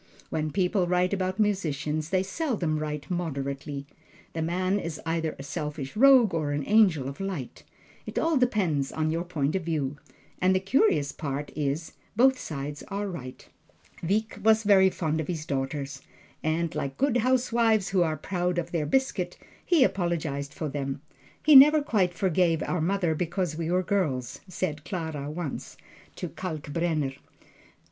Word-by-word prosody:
When 155 -1 -1
people 180 +1 +1
write 180 +2 +2
about 185 0 -1
musicians, 155 -7 0
they 185 0 +2
seldom 190 - -1
write 150 -1 -4
moderately. 140 -4 -3 0.5
The 165 - -3
man 185 +4 0
is 165 -4 -5
either 165 -1 -1
a 135 - -8
selfish 150 -2 -5
rogue 255 -4 +6
or 155 -3 -1
an 145 0 -1
angel 190 -11 +4
of 135 - -7
light 190 -10 -5 0.4
it - - -6
all 325 0 +2
depends 195 - +1
upon 155 0 -1
your 165 +1 -1
point 155 -3 -1
of 190 - -1
view. 150 -4 -2 0.4
And 185 +1 +4
the - - +3
curious 185 - +2
part 145 -1 -4
is, 150 +2 -2 0.2
both 260 +3 +4
sides 145 -1 -5
are 200 +1 -3
right. 130 -9 -8 0.5
Wieck 205 +4 -1
was 220 0 +5
very 195 -2 +6
fond 160 -3 -1
of 155 - -6
his 160 -4 -3
daughters, 140 0 -3 0.4
and 160 +1 0
like 135 -1 -3
good 270 -3 +2
housewives 235 -4 +2
who 195 -2 +2
are 160 -2 +1
proud 180 +2 -2
of 170 0 -2
their 155 -4 -1
biscuit, 265 - 0 0.3
he 330 -6 +4
apologized 165 - -1
for 155 - -4
them. 140 -1 -3 0.5
"He 305 -1 +7
never 300 +3 +10
quite 195 - +1
forgave 175 -3 +2
our 180 - -1
mother 175 -1 +1
because 175 0 -2
we 165 0 -3
were 180 +1 +2
girls," 140 -10 -1
said 155 -4 -3
Clara 160 -6 -4
once, 155 -2 -5 0.4
to 180 - -4
Kalkbrenner. 155 -3 -2
170 Hz, 160 wpm, -27 LUFS, 150-195 Hz, 0.5 s, never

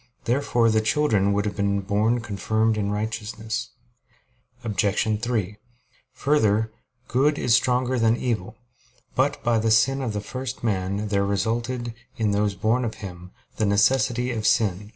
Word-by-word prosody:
Therefore 120 -2 +2
the 110 0 +3
children 110 -4 +2
would 100 +1 0
have 105 - -2
been 100 -1 0
born 105 +4 +1
confirmed 110 +1 0
in 100 -1 -1
righteousness. 110 +2 -3 0.9
Obj. 105 -2 +1 0.2
3: 110 -5 -2 0.6
Further, 110 -7 +2 0.4
good 145 +4 +2
is 120 - +2
stronger 125 +1 +2
than 115 +1 +3
evil. 110 -4 -2 0.6
But - - 0
by 120 -1 +2
the 110 +1 +1
sin 135 +5 +3
of 120 -5 -2
the 105 - -2
first 130 +4 -6
man 100 -1 -1
there 100 -1 +1
resulted, 115 +4 -1 0.2
in 110 -3 +1
those 100 0 +1
born 110 +6 +1
of 110 -2 -3
him, 90 -4 -9 0.3
the 110 - +1
necessity 120 +4 +2
of 110 -3 -1
sin. 105 -4 +1
110 Hz, 150 wpm, -24 LUFS, 105-120 Hz, 0.9 s, the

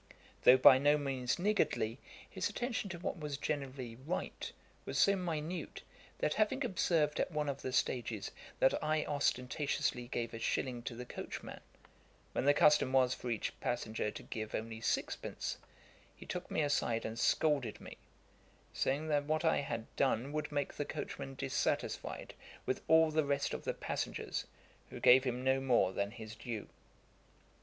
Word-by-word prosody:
Though 125 - +9
by 130 0 +9
no 145 +2 +5
means 135 -4 -1
niggardly, 175 - +1 0.3
his - - -2
attention 240 -4 -2
to 180 - -5
what 175 +1 -4
was 150 -2 -3
generally 135 -5 -3
right 145 +8 -4 0.3
was - - -4
so 200 - +5
minute, 170 -2 -4 0.3
that 150 - +1
having 220 - +1
observed 165 -7 +1
at - - +1
one 150 -1 -1
of 140 - -3
the 130 - -3
stages 120 -4 -1 0.3
that 135 - +3
I 155 0 +1
ostentatiously 140 -2 0
gave 115 -1 -3
a 115 - -5
shilling 120 +1 -1
to 120 - -4
the 125 +1 -6
coachman, - - -7 0.7
when - - 0
the 145 - +6
custom 150 -3 +5
was 130 -1 +4
for 125 - -5
each 115 -3 -1
passenger 110 -3 -1
to - - -8
give 110 -1 -5
only 110 0 -4
six - - 0
pence, - - -5 0.6
he - - -12
took - - -5
me - - 0
aside 120 -6 +1
and 110 +1 -4
scolded 145 -8 +2
me, - - -10 0.8
saying 145 +4 0
that 145 -1 +2
what 155 +2 0
I 160 - +4
had 115 -5 -3
done 135 0 +1
would 150 0 -2
make 145 -1 -1
the - - -2
coachman 70 0 -5
dissatisfied - - -2 0.3
with - - -1
all 160 0 +6
the 155 0 +2
rest 140 0 0
of - - -5
the - - 0
passengers, - - -3 0.4
who - - -8
gave 130 +2 +7
him 125 0 -1
no 130 0 +3
more 120 -8 +3
than 100 +1 -1
his 110 -1 -9
due. 115 -1 -6
135 Hz, 165 wpm, -34 LUFS, 120-150 Hz, 0.8 s, Though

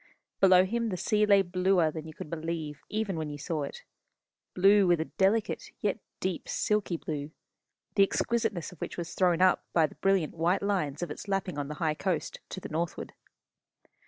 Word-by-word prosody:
Below 185 -1 +6
him 230 +3 -1
the 185 - -3
sea 210 +3 +2
lay 200 -1 +6
bluer 180 -2 +2
than 160 0 -7
you 155 - -9
could 150 - -8
believe 160 -3 -4
even 210 -4 -2
when 155 -1 -3
you 145 - -6
saw 155 +1 -3
it 140 - -6 0.7
blue 195 +1 +5
with 175 -2 +4
a 160 - -1
delicate 200 +5 0
yet 205 -2 -1 0.2
deep 185 -2 -3
silky 210 -5 0
blue, 150 -2 -4 0.6
the 200 - +3
exquisiteness 205 -3 +1
of 180 - -15
which - - -5
was 170 -1 -5
thrown 180 -1 +3
up 185 - +4
by 165 -2 +5
the 150 - -6
brilliant 195 -5 +1
white 170 +4 +1
lines 180 -7 -1
of 170 - -4
its 150 - -7
lapping 195 -5 -1
on 140 - -3
the 150 - -5
high 155 0 0
coast, 165 0 -2
to - - -5
the - - -7
northward. 165 +2 -3
180 Hz, 190 wpm, -29 LUFS, 160-195 Hz, 0.7 s, Below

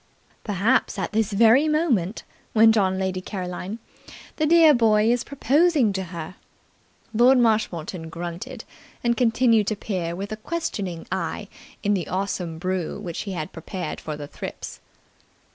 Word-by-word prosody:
"Perhaps 210 +5 +1
at - - -3
this 220 -1 0
very 230 +8 +5
moment," 260 - +1 0.3
went 225 0 +6
on 190 -3 +2
Lady 190 -1 -2
Caroline, 185 +1 -5 0.6
"the 310 - +1
dear 325 -1 +7
boy 220 -2 +4
is 245 0 +1
proposing 280 - +2
to 190 -1 -3
her." 170 0 -8 0.8
Lord 245 +4 +5
Marshmoreton 185 -8 0
grunted, 170 +1 -6 0.4
and 235 0 +2
continued 230 -3 +3
to 215 - 0
peer 180 -5 -3
with 200 +3 -6
a 215 - -4
questioning 205 - -4
eye - - -3 0.3
in 205 -1 +2
the 185 -4 -1
awesome 185 -3 -3
brew 185 +1 -3
which 175 -5 -5
he - - -3
had 155 -4 -5
prepared 175 0 -6
for 155 -1 -5
the 145 - -6
thrips. - - -8
205 Hz, 145 wpm, -24 LUFS, 180-235 Hz, 0.8 s, dear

